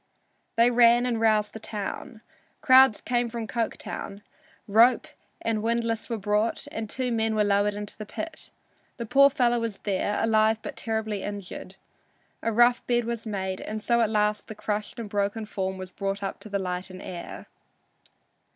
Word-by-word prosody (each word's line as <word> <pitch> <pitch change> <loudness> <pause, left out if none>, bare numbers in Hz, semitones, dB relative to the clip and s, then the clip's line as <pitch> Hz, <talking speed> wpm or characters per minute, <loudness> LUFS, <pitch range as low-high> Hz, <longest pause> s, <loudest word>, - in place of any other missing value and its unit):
They 235 +1 +5
ran 240 0 +5
and 235 -2 -1
roused 215 -2 +2
the 220 - -7
town. 220 +3 -6 0.4
Crowds 260 -4 +6
came 240 -1 0
from 230 -1 -4
Coketown. 215 -2 -4 0.4
Rope 230 +5 +5 0.4
and 225 -2 0
windlass 230 0 -1
were 230 - -1
brought 210 +2 0
and 220 -1 -5
two 255 +1 -2
men 225 -1 +1
were 210 - +3
lowered 205 0 +2
into 205 0 -6
the 215 -1 -8
pit. 320 +7 -6 0.5
The 235 - -4
poor 275 +4 +6
fellow 245 -4 +2
was 230 -4 -3
there, 205 +1 0
alive 220 0 +3
but - - -6
terribly 220 -2 -2
injured. 205 -3 -7 0.7
A 230 - 0
rough 240 +2 +4
bed 240 -1 +2
was 235 -1 -4
made, 190 -2 -3
and 215 0 -4
so 235 +2 +2
at 225 - +2
last 210 -1 0
the 220 - -8
crushed 210 0 -3
and 230 -2 -5
broken 205 +2 -1
form 190 -2 -3
was 185 0 -8
brought 195 +1 -3
up 195 - -4
to 215 - -11
the 200 - 0
light 180 -1 -3
and 185 0 -9
air. 175 -2 -7
220 Hz, 175 wpm, -26 LUFS, 205-235 Hz, 0.7 s, Crowds